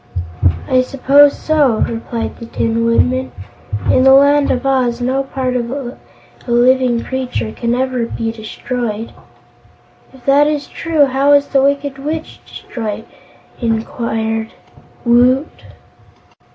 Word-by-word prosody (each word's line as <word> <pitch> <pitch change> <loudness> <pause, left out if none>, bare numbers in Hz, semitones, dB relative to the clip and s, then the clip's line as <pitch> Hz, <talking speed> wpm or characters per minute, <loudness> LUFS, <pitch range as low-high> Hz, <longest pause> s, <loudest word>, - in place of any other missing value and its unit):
"I 255 0 +3
suppose 280 +2 +4
so." 295 -7 +2
replied 230 0 -5
the 230 - -9
Tin 230 0 -1
Woodman. 255 +3 +1 0.6
"In - - +4
the 265 0 +7
Land 285 +1 +4
of 250 +1 -1
Oz 255 -3 +1
no 260 +2 0
part 265 -2 -3
of 235 -1 -2
a 260 -1 -5 0.5
living 245 0 +2
creature 250 - -3
can 235 - -2
ever 255 -2 -1
be 225 -1 -3
destroyed." 225 0 -5 1.0
"If 265 -2 -18
that 285 +2 +4
is 300 -1 -1
true, 320 -3 +1
how 275 +2 +2
was 285 0 +3
that 275 - +2
Wicked 280 0 0
Witch 310 +3 -5
destroyed?" 220 -2 -6 0.6
inquired 225 -1 -2 0.5
Woot. 250 +5 +2
255 Hz, 125 wpm, -16 LUFS, 235-275 Hz, 1.0 s, the